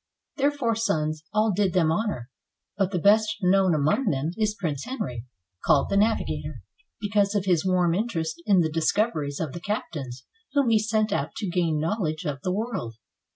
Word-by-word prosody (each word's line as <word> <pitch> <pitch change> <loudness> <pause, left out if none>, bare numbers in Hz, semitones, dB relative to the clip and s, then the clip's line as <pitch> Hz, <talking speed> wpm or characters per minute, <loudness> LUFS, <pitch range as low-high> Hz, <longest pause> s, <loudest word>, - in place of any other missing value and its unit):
Their 280 0 +3
four 270 -6 -1
sons 155 -8 -1
all 215 0 +2
did 195 -3 +1
them 165 -4 +3
honor, 165 - -2 0.4
but 195 -2 +1
the 190 - -2
best 215 +4 +4
known 185 -1 +4
among 155 - +1
them 145 +3 0
is 215 0 0
Prince 150 -7 -2
Henry, 130 - -5 0.4
called 140 - +3
the 200 - 0
"Navigator," 130 - 0 0.4
because 205 -1 +1
of 200 -2 0
his 175 -4 +2
warm 180 -2 +2
interest 170 -6 -2
in 195 -4 +5
the 160 -2 0
discoveries 155 -3 0
of 155 -5 -3
the 175 - -7
captains 140 - -4 0.3
whom 280 -4 +3
he 220 -1 +4
sent 215 0 0
out - - -2
to 205 - -3
gain 170 -4 +1
knowledge 160 -2 -2
of 140 -3 -3
the 185 - -1
world. 200 - -3
185 Hz, 180 wpm, -25 LUFS, 155-215 Hz, 0.4 s, in